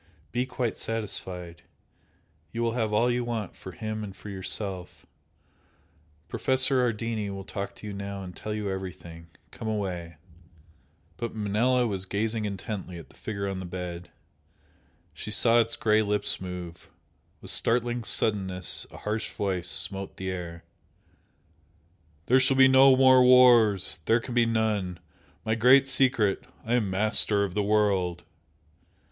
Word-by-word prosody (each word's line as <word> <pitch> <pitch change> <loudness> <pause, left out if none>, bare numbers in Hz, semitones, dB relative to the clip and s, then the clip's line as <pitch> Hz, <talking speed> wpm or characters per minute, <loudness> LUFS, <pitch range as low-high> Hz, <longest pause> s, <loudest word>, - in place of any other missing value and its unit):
Be 125 +5 -1
quite 125 -3 -3
satisfied! 95 -6 -4 0.9
You 115 - -3
will 115 - +1
have 115 -2 -1
all 115 +3 +2
you 120 0 -1
want 115 -4 -4
for 95 - -10
him 110 +1 -5
and 100 -2 -8
for 105 - -11
yourself. 95 -1 -5 1.2
Professor 130 0 +1
Ardini 115 -3 -2
will 100 0 -6
talk 100 +1 -6
to - - -12
you 105 - -5
now 100 0 -6
and 90 -1 -9
tell 110 - -6
you 105 -1 -3
everything 90 -3 -7 0.2
come 110 - -7
away 90 -6 -4 0.5
" 80 +1 -34
But 115 -1 -5
Manella 115 +4 +1
was 95 -4 -3
gazing 110 +2 -2
intently 100 -2 -5
at 85 - -11
the - - -21
figure 100 -2 -5
on 95 -1 -4
the 95 - -6
bed 90 -1 -6 1.0
she 80 - -7
saw 115 +2 +4
its 115 0 -3
grey 110 0 +2
lips 105 -2 -1
move. 90 -2 -8 0.5
With - - -5
startling 120 0 0
suddenness 95 -5 +1
a - - -12
harsh 110 +1 -3
voice 95 -3 -3
smote 95 +1 0
the 95 0 -4
air 85 -2 -7 1.6
"There 130 +2 +4
shall 130 0 +2
be 135 0 +8
no 130 0 +7
more 130 -1 +6
wars! 120 -8 +6
There 115 +1 +4
can 120 +1 -7
be 120 -1 +3
none! 105 -6 -1 0.5
My 110 - +1
Great 125 +5 +5
Secret! 130 -6 +1 0.2
I 115 - -1
am 115 -5 +1
Master 105 +1 +1
of 95 -3 -3
the 105 - 0
World!" 100 -4 +1
105 Hz, 150 wpm, -27 LUFS, 95-115 Hz, 1.6 s, be